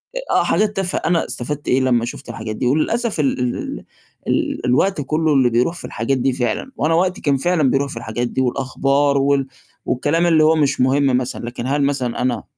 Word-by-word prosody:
آآ، - - -2
آه، - - +4
حاجات 210 0 +1
تافه 190 -1 0
أنا 170 0 0
استفدت 145 +4 -5
إيه 130 - +3
لمّا 120 -2 +2
شُفت 120 - -8
الحاجات 110 -2 -5
دي 125 - -3
وللأسف 205 - 0
ال 135 -3 +1
ال 125 -1 -1 0.2
ال - - -18 0.4
ال - - -1
الوقت 150 +7 +2
كلّه 155 +2 0
اللي 130 -3 +4
بيروح 125 +9 +1
في - - -7
الحاجات 130 +4 -1
دي 130 +1 +1
فعلًا 125 - -2
وأنا 160 +2 +1
وقتي 185 +2 +1
كان 140 -2 +1
فعلًا 155 -2 +2
بيروح 140 0 0
في - - -7
الحاجات 120 +1 -3
دي 130 - -2
والأخبار 135 +2 +1
وال 140 0 +1 0.4
والكلام 145 +7 +1
اللي 160 -2 +4
هو 160 +1 +4
مش 145 -4 +1
مهم 135 0 +3
مثلًا، 125 -1 -4
لكن 120 +1 -5
هل 145 +1 +1
مثلًا 135 -4 -1
أنا 125 -1 -1
135 Hz, 210 wpm, -19 LUFS, 125-155 Hz, 0.4 s, آه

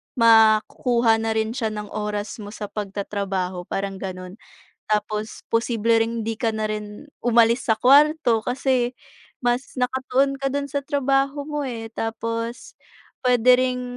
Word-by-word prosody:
maku-kuha 225 0 +4
na 225 0 -1
rin 220 0 0
siya 230 -2 -2
ng 210 -1 -6
oras 210 0 -4
mo 210 0 -8
sa 205 -1 -7
pag-tatrabaho, 195 -3 -3
parang 195 0 -3
gano'n. 185 +1 -7 0.5
Tapos, 215 0 -2
posible 230 -1 +2
ring 225 -1 -3
'di 225 - -1
ka 225 +1 -1
na 220 -1 -2
rin, 210 +4 -6 0.2
umalis 235 0 +3
sa 220 - +3
kwarto 280 -4 +4
kasi, 250 0 0 0.5
mas 245 +2 -2
naka-tuon 260 +2 +1
ka 275 0 -2
do'n 280 +1 -2
sa 280 0 -3
trabaho 275 0 0
mo, 295 -1 -3
eh. 230 -4 -5
Tapos, 230 +1 -4 0.5
puwede 250 0 +5
ring, 250 -1 0
230 Hz, 140 wpm, -23 LUFS, 215-255 Hz, 0.5 s, puwede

